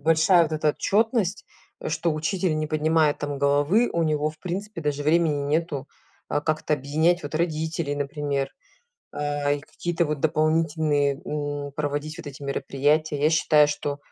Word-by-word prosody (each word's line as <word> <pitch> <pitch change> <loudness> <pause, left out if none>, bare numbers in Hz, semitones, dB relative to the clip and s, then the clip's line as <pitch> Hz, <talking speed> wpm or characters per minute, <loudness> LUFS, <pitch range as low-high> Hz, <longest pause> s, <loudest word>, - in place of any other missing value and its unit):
большая 165 +3 +4
вот 160 - -5
эта 155 -1 +2
отчетность, 210 - 0 0.4
что 170 - 0
учитель 165 +1 -1
не 155 - -1
поднимает 155 0 +2
там 145 -1 -4
головы, 145 - +3
у 170 - +1
него 155 -1 +1
в 155 - -18
принципе 190 +1 -5
даже 145 -1 -2
времени 155 -2 +2
нету, 150 -1 -1 0.4
э, 145 - +1
как-то 155 0 0
объединять 155 +6 +1
вот 145 +1 -6
родителей, 160 -2 -1
например, 145 -1 -2 0.7
э, 145 0 0
и - - -8
какие-то 170 +3 -2
вот 150 -2 -2
дополнительные, 155 -2 +1
м, 145 -1 -4
проводить 145 +3 -3
вот 165 - -9
эти 145 0 -9
мероприятия. 145 +2 0
Я 155 - +4
считаю, 155 -2 +5
что 145 -1 -3
155 Hz, 155 wpm, -25 LUFS, 145-165 Hz, 0.7 s, считаю